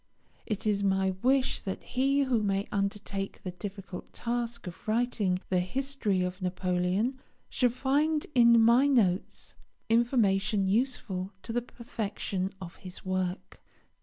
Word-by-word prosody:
It 215 -3 -3
is 205 -1 +1
my 190 -1 +2
wish 265 +1 +2
that 190 - -5
he 275 +3 +1
who 250 -4 +1
may 200 -1 0
undertake 200 0 -3
the 185 - -4
difficult 195 0 -8
task 235 -1 -3
of 180 +3 -9
writing 215 -5 +1
the 185 - +2
history 215 -1 -1
of 180 +1 -4
Napoleon 185 +6 0 0.3
shall 250 - +2
find 290 +5 +1
in 235 -2 +7
my 235 +5 +6
notes 210 -9 +1 0.4
information 220 -4 +2
useful 200 -4 -1
to 225 - -5
the 240 - +1
perfection 205 -5 -4
of 170 -2 -9
his 185 +1 -9
work. 185 0 -3
210 Hz, 135 wpm, -29 LUFS, 190-245 Hz, 0.4 s, in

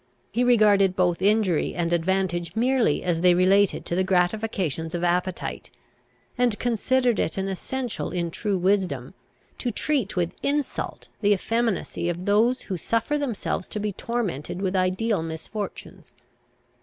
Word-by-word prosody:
He 245 - +1
regarded 205 -6 +4
both 180 -2 +1
injury 200 -4 +2
and 170 0 0
advantage 175 0 0
merely 245 - +2
as 175 -2 0
they 180 -1 +5
related 190 +2 +3
to - - -4
the 185 +2 +2
gratifications 180 -4 0
of 175 - -3
appetite; 180 +1 -1 0.7
and 240 -4 +2
considered 245 +1 +1
it 160 - -1
an 195 0 -1
essential 245 +6 -3
in 170 -2 -2
true 205 +2 -1
wisdom, 190 +1 0 0.5
to 245 - -1
treat 250 -2 -1
with 175 -2 0
insult 285 0 -2
the 205 -1 +4
effeminacy 220 -4 -1
of 175 +1 -4
those 225 +5 +3
who 190 - -4
suffer 230 - 0
themselves 240 -9 -2
to 210 - -4
be 210 -1 -2
tormented 180 - -3
with 190 0 -1
ideal 190 +2 +1
misfortunes. 165 +6 -7
195 Hz, 145 wpm, -25 LUFS, 175-225 Hz, 0.7 s, they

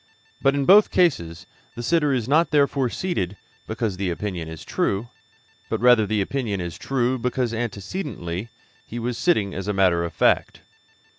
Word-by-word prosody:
But 135 +1 +3
in 140 -1 0
both 205 +5 +7
cases 85 - +1 0.3
the 120 - -6
sitter 150 +1 +2
is 125 -4 -1
not 155 +5 +3
therefore 140 -3 +2
seated 105 - -3 0.3
because 110 -3 -2
the 95 -1 -1
opinion 90 -2 -4
is 80 -1 -9
true, 105 +4 -1 0.6
but - - -1
rather 120 -3 +5
the 110 -1 0
opinion 110 -2 -2
is 85 -2 -5
true 130 -1 -1
because 125 -1 -1
antecedently 110 - -4 0.3
he 120 - -8
was 120 +1 -2
sitting 115 - +1
as 95 +2 -5
a 105 - 0
matter 90 -3 +3
of 85 - -3
fact. - - +1
115 Hz, 165 wpm, -23 LUFS, 95-135 Hz, 0.6 s, both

